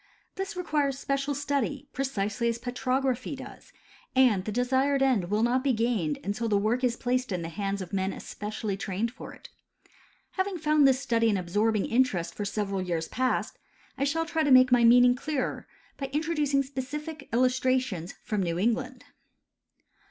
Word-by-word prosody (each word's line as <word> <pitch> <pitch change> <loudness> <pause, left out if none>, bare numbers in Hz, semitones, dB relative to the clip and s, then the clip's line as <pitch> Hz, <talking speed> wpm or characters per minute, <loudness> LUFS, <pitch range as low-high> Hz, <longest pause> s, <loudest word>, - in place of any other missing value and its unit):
This 385 +1 -5
requires 295 -6 0
special 275 +1 -1
study, 285 0 -2
precisely 235 -4 -1
as 230 - -1
petrography 255 +2 -1
does, 265 - -11 0.4
and 245 -8 +4
the 215 - -3
desired 265 +4 +2
end 250 -9 +2
Avill 210 +5 0
not 250 +2 +2
be 275 -2 +2
gained 220 -10 0
until 210 +5 -2
the 205 - +3
work 220 +5 0
is 245 -2 +2
placed 250 -1 -1
in 180 -2 -2
the 165 - -4
hands 195 +3 -3
of 185 - -12
men 190 0 0
especially 210 0 -5
trained 200 +4 -2
for 260 - -10
it. - - -14 0.8
Having 380 -1 -2
found 305 -3 +4
this 260 -1 +3
study 230 -3 +1
an 205 - +2
absorbing 205 +4 +1
interest 200 -9 +1
for 205 - -4
several 200 -1 -2
years 170 -3 -2
past, 255 0 -1 0.4
I 275 - -2
shall 325 +4 0
try 325 -1 -1
to 295 - +2
make 255 -1 +7
my 245 -1 +5
meaning 245 +1 +7
clearer 275 +2 -3 0.3
by 275 - -3
introducing 295 -1 0
specific 285 +3 -6
illustrations 255 -7 +1
from 210 -4 -1
New 170 -2 -1
England. 240 +5 -1
250 Hz, 165 wpm, -28 LUFS, 210-275 Hz, 0.8 s, make